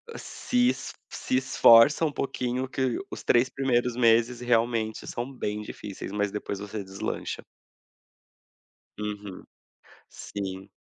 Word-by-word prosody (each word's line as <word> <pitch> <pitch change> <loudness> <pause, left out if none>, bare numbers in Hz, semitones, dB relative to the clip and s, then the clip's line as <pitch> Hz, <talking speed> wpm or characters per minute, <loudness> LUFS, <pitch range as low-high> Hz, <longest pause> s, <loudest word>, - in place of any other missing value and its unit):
se 245 0 0
es - - -4 0.2
se 130 - -1
esforça 130 +3 +6
um 150 - 0
pouquinho 130 -2 -2
que 130 -2 -1
os - - -7
3 120 +2 +4
primeiros 125 -3 0
meses 120 0 +3
realmente 115 -2 +1
são 120 +3 -4
bem 105 -4 -3
difíceis, 100 -2 -7
mas 105 -1 -1
depois 100 -1 -4
você 105 0 -5
deslancha. 95 0 -4 1.6
Uhum, 105 -2 -6 0.6
sim. 95 -1 -6
115 Hz, 115 wpm, -27 LUFS, 105-130 Hz, 1.6 s, esforça